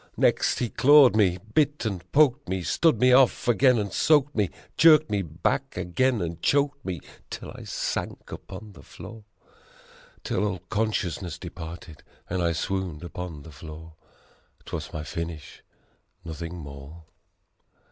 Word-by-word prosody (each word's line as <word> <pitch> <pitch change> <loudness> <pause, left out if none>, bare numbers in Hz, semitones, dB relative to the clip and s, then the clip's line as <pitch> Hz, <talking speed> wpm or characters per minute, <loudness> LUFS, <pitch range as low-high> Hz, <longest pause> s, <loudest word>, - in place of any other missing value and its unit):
Next - - +2
he 125 - 0
clawed 145 -3 +6
me, 95 -5 +3 0.2
bit 150 -3 +1
and 95 -4 -4
poked 145 -1 +3
me, 95 -1 -2
stood 165 - +2
me 125 0 +5
off 130 -1 +4
again 125 +1 +4
and 100 -3 -2
soaked 145 -2 +3
me, 105 -5 +1 0.3
Jerked 155 -3 +6
me 100 -1 +1
back 85 -1 -2
again 120 +4 0
and 85 0 -5
choked 140 0 +1
me, 90 -6 -4 0.3
till - - -7
I - - -10
sank - - -4
upon 105 +2 -9
the 80 - -14
floor. 110 -2 -12 1.0
Till 90 - -1
all 95 -4 -2
consciousness 100 -6 -2
departed 80 -1 -9 0.3
and 90 0 -2
I 85 -1 +2
swooned 90 -1 -3
upon 85 -3 -7
the 80 - -12
floor. 80 +3 -11 0.7
'Twas - - -6
my 75 - -5
finish, 80 0 -6 0.6
nothing 85 +2 -6
more. 70 +1 -10
95 Hz, 145 wpm, -26 LUFS, 85-125 Hz, 1.0 s, clawed